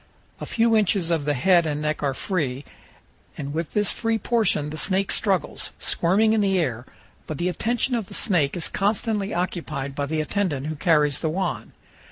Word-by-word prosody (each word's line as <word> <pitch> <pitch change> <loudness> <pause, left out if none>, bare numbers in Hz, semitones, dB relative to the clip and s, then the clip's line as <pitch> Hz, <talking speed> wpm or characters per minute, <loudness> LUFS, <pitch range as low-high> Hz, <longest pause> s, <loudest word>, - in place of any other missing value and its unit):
A - - -6
few 230 0 +2
inches 195 -5 +2
of 160 -4 0
the 145 -1 +1
head 170 +5 +4
and 150 -1 -2
neck 150 0 -2
are 140 -2 0
free, 140 -8 -2 0.7
and 145 -1 -5
with 165 +1 -3
this 210 -1 +2
free 225 -1 0
portion 210 -10 +1
the 155 - -6
snake 195 0 +2
struggles, 195 -4 0
squirming 205 +6 +2
in 220 - +2
the 195 -2 +2
air; 125 -8 -2 0.4
but 155 - -4
the 175 +4 0
attention 240 +7 -1
of 225 -5 -1
the - - -5
snake 175 -8 +1
is 170 - -2
constantly 210 0 -1
occupied 160 -6 -3
by 140 +1 -2
the 155 +2 -1
attendant 155 -4 -1
who 155 +1 -3
carries 150 -3 +2
the 160 - -1
wand. 155 - -3
170 Hz, 190 wpm, -24 LUFS, 150-200 Hz, 0.7 s, head